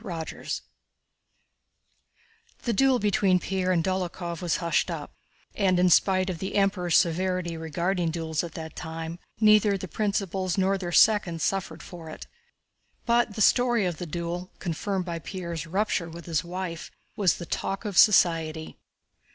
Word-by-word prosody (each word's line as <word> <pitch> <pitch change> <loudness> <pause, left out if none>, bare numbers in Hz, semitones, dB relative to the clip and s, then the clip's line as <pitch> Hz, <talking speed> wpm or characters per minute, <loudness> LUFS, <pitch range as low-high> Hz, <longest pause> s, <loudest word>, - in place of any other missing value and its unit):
CHAPTER 170 -6 -6
VI - - -11 2.1
The 235 - 0
duel 265 +3 +4
between 200 -3 +2
Pierre 185 +1 -1
and 170 -3 +2
Dólokhov 175 -2 -3
was 175 -2 0
hushed 170 -2 0
up - - -6 0.4
and, 190 -3 +2
in 180 0 +4
spite 185 +2 +4
of 170 - -6
the 190 - -4
Emperor's 195 -4 +2
severity 180 0 0
regarding 170 +3 -1
duels 160 -1 -2
at 170 -2 -7
that 160 -1 -7
time, 165 +1 -6 0.2
neither 215 -2 +5
the 185 - -6
principals 195 -2 -1
nor 190 +1 +2
their 175 -2 -4
seconds 180 -5 +4
suffered 185 -4 -2
for 165 -3 -10
it. 155 - -9 0.8
But 235 -3 +2
the 215 - -3
story 240 -1 +4
of 175 -3 -2
the 175 - -6
duel, 175 +2 -4
confirmed 185 +2 -3
by 170 -2 -4
Pierre's 170 -3 -5
rupture 190 -1 -1
with 170 +1 -10
his 165 -2 -1
wife, 175 -1 -5 0.3
was 195 -4 +2
the 170 - -7
talk 195 +5 -3
of 205 -3 -4
society. 165 -5 +3
180 Hz, 155 wpm, -26 LUFS, 170-195 Hz, 2.1 s, neither